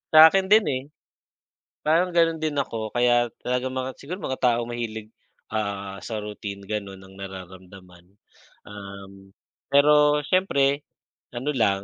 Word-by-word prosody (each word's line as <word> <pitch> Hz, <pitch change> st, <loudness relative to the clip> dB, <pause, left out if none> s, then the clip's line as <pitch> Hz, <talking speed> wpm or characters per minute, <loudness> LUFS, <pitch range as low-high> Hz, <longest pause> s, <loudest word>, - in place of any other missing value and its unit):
Sa 160 Hz, +1 st, +11 dB
akin 195 Hz, -1 st, +1 dB
din 215 Hz, +2 st, +5 dB
eh, 130 Hz, -1 st, -2 dB, 1.0 s
parang 165 Hz, +4 st, +3 dB
ganun 165 Hz, -1 st, +3 dB
din 155 Hz, -1 st, -2 dB
ako, 115 Hz, -6 st, -2 dB
kaya 120 Hz, 0 st, +3 dB, 0.2 s
talagang 125 Hz, +1 st, -2 dB
mga 130 Hz, 0 st, -3 dB
siguro 160 Hz, +6 st, -6 dB
mga 130 Hz, -, -3 dB
taong 120 Hz, -1 st, +2 dB
mahilig 110 Hz, -2 st, -5 dB, 0.4 s
ah, 100 Hz, -2 st, -3 dB
sa 110 Hz, -, -5 dB
routine, 100 Hz, -1 st, -7 dB
gano'n 100 Hz, -2 st, -5 dB
ang 95 Hz, 0 st, -15 dB
nararamdaman. 95 Hz, -1 st, -11 dB, 0.6 s
Um, 100 Hz, -1 st, -11 dB, 0.4 s
pero 150 Hz, +1 st, +5 dB
siyempre 140 Hz, -6 st, +2 dB, 0.5 s
ano 125 Hz, +4 st, -3 dB
lang, 100 Hz, -6 st, +1 dB
120 Hz, 130 wpm, -24 LUFS, 100-140 Hz, 1.0 s, Sa